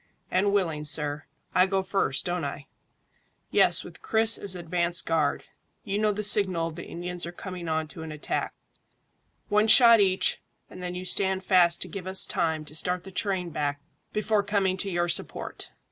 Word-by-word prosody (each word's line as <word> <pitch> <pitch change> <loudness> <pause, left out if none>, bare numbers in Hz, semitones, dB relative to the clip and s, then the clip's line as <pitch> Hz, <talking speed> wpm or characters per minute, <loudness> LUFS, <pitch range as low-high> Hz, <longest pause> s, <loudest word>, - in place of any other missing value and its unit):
"And 195 +2 +2
willing, 165 -7 0
sir. 150 0 -1 0.3
I 185 +1 +4
go 190 0 0
first, 185 -7 0
don't 175 -2 -2
I?" 140 0 -5 0.9
"Yes, - - +3
with - - -13
Chris 225 - +2
as 195 -2 -5
advance 175 0 -1
guard. 165 -1 0 0.4
You 205 -2 -2
know 215 0 +2
the 210 +1 -4
signal 190 -5 +3
if 160 - -11
the 170 - -8
Indians 175 0 -4
are - - -6
coming 175 -1 -7
on 160 0 -1
to 160 - -10
an 160 -1 -7
attack 150 -1 -3 0.9
one 210 +1 +2
shot 235 0 +8
each, 190 -2 +2 0.3
and 185 - -10
then 180 0 -5
you 180 +1 -6
stand 190 0 0
fast 175 -3 +4
to - - -6
give 190 -2 -7
us 190 0 +3
time 160 -2 -1
to 150 - -9
start 180 +2 -2
the 190 - -11
train 185 -2 -1
back 145 -1 -2 0.3
before 215 0 +1
coming 200 -2 0
to 195 +1 -3
your 175 -1 0
support." - - -1
180 Hz, 185 wpm, -26 LUFS, 165-195 Hz, 0.9 s, shot